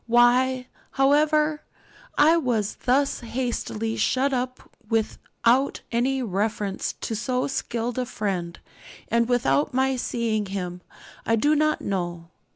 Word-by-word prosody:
Why, 250 +2 +4 0.3
however, 300 +2 +3 0.6
I 310 +3 +6
was 240 -10 0
thus 275 +3 +2
hastily 230 -2 -3
shut 265 +5 +1
up 255 0 -3 0.2
without 235 +3 0
any 255 +3 +1
reference 205 -1 -2
to 225 - -3
so 250 +3 -1
skilled 240 -2 -2
a 250 - -2
friend, 185 -6 -3 0.5
and 235 +1 +2
without 150 - +2
my 265 0 +2
seeing 225 -4 -1
him, 180 -2 -4 0.4
I 225 - +2
do 295 +7 +3
not 305 0 +1
know. 175 -3 -3
240 Hz, 120 wpm, -25 LUFS, 215-265 Hz, 0.6 s, I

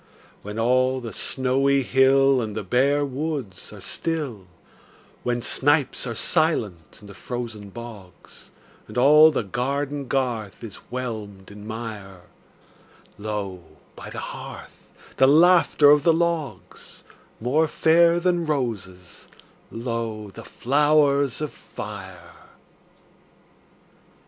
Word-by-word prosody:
When 105 +1 -7
all 130 +3 +2
the 115 -3 -7
snowy 135 +1 +1
hill 135 +1 +4
And 110 -2 -5
the 110 - -3
bare 140 +8 +2
woods 140 - -5
are 105 - -11
still; 140 - -4 0.7
When 120 -1 -2
snipes 145 -1 +1
are 115 - -4
silent 110 - 0
in - - -14
the 100 - -11
frozen 110 -2 -6
bogs, 105 -4 -12 0.4
And 110 - -9
all 150 +5 +7
the 145 -6 -1
garden 140 +6 -3
garth 120 -7 -2
is 110 -4 -8
whelmed 110 -6 -6
in 105 +1 -11
mire, 105 -5 -7 1.0
Lo, 100 -4 -5 0.3
by - - -9
the - - -9 0.2
hearth, - - -10 0.4
the 130 - +5
laughter 160 -1 +5
of 150 0 +5
the 165 +3 +4
logs— 160 - -3 0.4
More 145 +8 +1
fair 170 +2 +4
than 175 -2 0
roses, 105 - -4 0.4
lo, 115 -3 -4
the - - -11
flowers 145 0 +2
of 150 - -3
fire! - - -10
125 Hz, 115 wpm, -23 LUFS, 105-145 Hz, 1.0 s, all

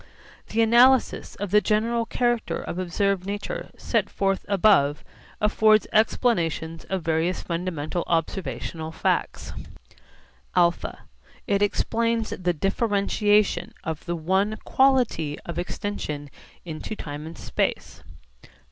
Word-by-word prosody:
The 225 +1 +2
analysis 245 +3 +4
of 205 -2 -5
the 210 +1 +5
general 230 +2 +1
character 240 -1 0
of 175 - -5
observed 185 +1 0
nature 205 - -4
set - - 0
forth 195 -1 0
above 190 -8 +4 0.4
affords 215 0 +4
explanations 170 -8 +1
of 190 -3 -3
various 165 +3 0
fundamental 170 -1 -3
observational 165 -1 -2
facts: - - -1 1.0
(α) 175 -1 +2 0.5
It 200 -3 +1
explains 230 +2 0
the 180 -1 0
differentiation 205 +3 +1
of 160 -1 -4
the 175 - -2
one 190 +6 0
quality 250 - +2
of 170 0 -4
extension 165 -7 -4 0.3
into 165 +6 -5
time 150 -3 -7
and 165 - -9
space. - - -2
195 Hz, 110 wpm, -25 LUFS, 165-215 Hz, 1.0 s, the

